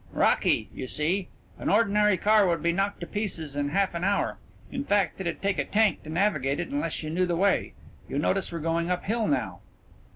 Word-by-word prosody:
"Rocky, -, -, +2 dB
you 130 Hz, -, -6 dB
see. 175 Hz, +8 st, 0 dB, 0.3 s
An -, -, -2 dB
ordinary 210 Hz, -2 st, +3 dB
car 210 Hz, +1 st, +4 dB
would 170 Hz, -3 st, 0 dB
be 170 Hz, -, +3 dB
knocked 195 Hz, +3 st, -1 dB
to -, -, -3 dB
pieces 170 Hz, -7 st, -4 dB
in 145 Hz, 0 st, -1 dB
half 195 Hz, +4 st, +1 dB
an 170 Hz, +1 st, -3 dB
hour. 200 Hz, +1 st, 0 dB, 0.3 s
In 270 Hz, 0 st, -3 dB
fact, 200 Hz, -, +1 dB
it'd 170 Hz, 0 st, -4 dB
take 200 Hz, -1 st, 0 dB
a -, -, +2 dB
tank 215 Hz, 0 st, +2 dB
to 155 Hz, -, -11 dB
navigate 155 Hz, -6 st, +1 dB
it -, -, -3 dB
unless 285 Hz, -, -2 dB
you 155 Hz, -, -4 dB
knew 180 Hz, +2 st, +1 dB
the 175 Hz, -, 0 dB
way. 195 Hz, +3 st, +1 dB, 0.4 s
You -, -, -3 dB
notice 185 Hz, +6 st, 0 dB
we're 170 Hz, -, -4 dB
going 165 Hz, +2 st, 0 dB
uphill 215 Hz, +5 st, 0 dB
now." 295 Hz, -, -1 dB
185 Hz, 205 wpm, -27 LUFS, 165-205 Hz, 0.4 s, car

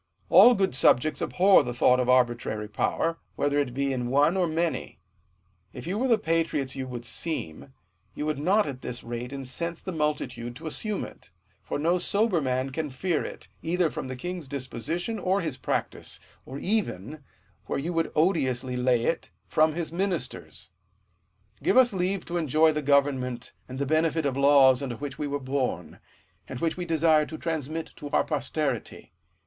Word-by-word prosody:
All 245 Hz, -, +8 dB
good 195 Hz, -, +1 dB
subjects 135 Hz, +3 st, +3 dB
abhor 190 Hz, +2 st, +5 dB
the 120 Hz, 0 st, -4 dB
thought 125 Hz, +1 st, +4 dB
of 125 Hz, 0 st, 0 dB
arbitrary 120 Hz, -4 st, +2 dB
power, 165 Hz, +9 st, -1 dB, 0.2 s
whether 145 Hz, 0 st, +1 dB
it 140 Hz, -4 st, 0 dB
be 140 Hz, 0 st, 0 dB
in 125 Hz, -2 st, -2 dB
one 145 Hz, +6 st, +3 dB
or 185 Hz, -2 st, +2 dB
many: 165 Hz, -, -2 dB, 0.7 s
if -, -, -8 dB
you 190 Hz, +5 st, -2 dB
were 260 Hz, -, +1 dB
the 235 Hz, -3 st, +4 dB
patriots 160 Hz, -7 st, -1 dB
you 130 Hz, -1 st, -4 dB
would 120 Hz, -2 st, -6 dB
seem, 135 Hz, -, -4 dB, 0.4 s
you 150 Hz, -, -3 dB
would 150 Hz, -2 st, -1 dB
not 195 Hz, +8 st, +3 dB
at 135 Hz, -3 st, -6 dB
this 125 Hz, 0 st, -4 dB
rate 120 Hz, +1 st, -5 dB
incense 140 Hz, +5 st, -3 dB
the 190 Hz, -, -5 dB
multitude 150 Hz, -6 st, -2 dB
to 125 Hz, -, -11 dB
assume 205 Hz, +6 st, -3 dB
it; -, -, -14 dB, 0.3 s
for 95 Hz, -, -4 dB
no 170 Hz, +5 st, +2 dB
sober 200 Hz, -1 st, +1 dB
man 130 Hz, 0 st, -1 dB
can 150 Hz, +2 st, -3 dB
fear 160 Hz, +5 st, -1 dB
it, -, -, -7 dB
either 170 Hz, -1 st, +1 dB
from -, -, -5 dB
the 130 Hz, -, -5 dB
king's 175 Hz, +3 st, -5 dB
disposition 145 Hz, -, -4 dB
or 190 Hz, +1 st, +1 dB
bis 155 Hz, -7 st, -3 dB
practice; -, -, -3 dB, 0.3 s
or 135 Hz, -, -6 dB
even, 155 Hz, -, -2 dB, 0.5 s
where -, -, -1 dB
you 165 Hz, +6 st, -2 dB
Mould 165 Hz, -1 st, +1 dB
odiously 130 Hz, -7 st, +1 dB
lay 125 Hz, -1 st, +2 dB
it, 165 Hz, -, -1 dB, 0.2 s
from 155 Hz, 0 st, +3 dB
his 170 Hz, -2 st, -3 dB
ministers. 170 Hz, -, -3 dB, 0.9 s
Give -, -, +2 dB
us 250 Hz, -4 st, +6 dB
leave 190 Hz, +1 st, -1 dB
to 175 Hz, -, -3 dB
enjoy 155 Hz, 0 st, +3 dB
the 150 Hz, 0 st, -2 dB
government 135 Hz, -4 st, +1 dB, 0.2 s
and 130 Hz, -, -6 dB
the 140 Hz, -, -1 dB
benefit 160 Hz, +1 st, +1 dB
of 135 Hz, -2 st, 0 dB
laws 140 Hz, -2 st, +6 dB
under 130 Hz, -4 st, -3 dB
which 140 Hz, +2 st, -7 dB
we 150 Hz, -, -1 dB
were 145 Hz, 0 st, -2 dB
born, 130 Hz, -1 st, -3 dB, 0.5 s
and 130 Hz, -, -6 dB
which 165 Hz, +2 st, 0 dB
we 180 Hz, -, -4 dB
desire 160 Hz, -2 st, +3 dB
to 155 Hz, -, -7 dB
transmit 160 Hz, -1 st, -3 dB
to 145 Hz, -, -7 dB
our -, -, +2 dB
posterity. 140 Hz, -, -3 dB
150 Hz, 180 wpm, -27 LUFS, 130-170 Hz, 0.9 s, All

